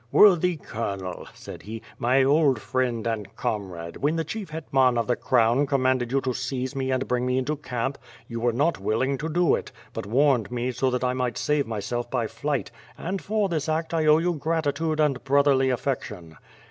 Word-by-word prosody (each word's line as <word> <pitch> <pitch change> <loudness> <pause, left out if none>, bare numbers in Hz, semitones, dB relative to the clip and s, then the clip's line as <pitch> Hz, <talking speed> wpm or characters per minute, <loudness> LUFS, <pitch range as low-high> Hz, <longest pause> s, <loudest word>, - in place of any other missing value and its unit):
"Worthy 180 -4 +5
Colonel," 100 -8 -5
said - - -10
he, 110 +2 -8 0.2
"my 130 +3 +3
old 140 -3 +3
friend 120 -2 -1
and 110 -3 -3
comrade, 90 -5 -4
when 150 +3 0
the 165 - 0
Chief 195 +4 -6
ITetman 135 -5 +2
of 115 - +1
the 125 - +1
Crown 125 +4 +2
commanded 130 -3 +1
you 135 - +3
to 130 -1 -1
seize 130 +2 -3
me 135 -1 -1
and 130 0 0
bring 125 0 0
me 125 0 +1
into 140 +4 0
camp, 135 -1 -3 0.3
you 115 -1 -5
were 120 +1 +2
not 145 +8 +1
willing 115 +8 0
to 160 - -3
do 175 +1 +3
it, - - -2 0.2
but - - -5
warned 130 -1 +3
me 125 +1 -2
so 130 +2 0
that 125 0 -1
I 125 0 +1
might 125 -1 -2
save 150 -3 +1
myself 115 +2 -3
by 120 -3 0
flight, 140 +4 -3 0.3
and 190 +3 -3
for 210 -1 0
this 160 -5 -2
act 160 +1 -1
I 160 -2 +1
owe 150 0 +7
you 175 +2 +1
gratitude 155 0 -1
and 145 -4 +1
brotherly 140 -1 +3
affection." 105 - -3
130 Hz, 200 wpm, -25 LUFS, 120-150 Hz, 0.3 s, owe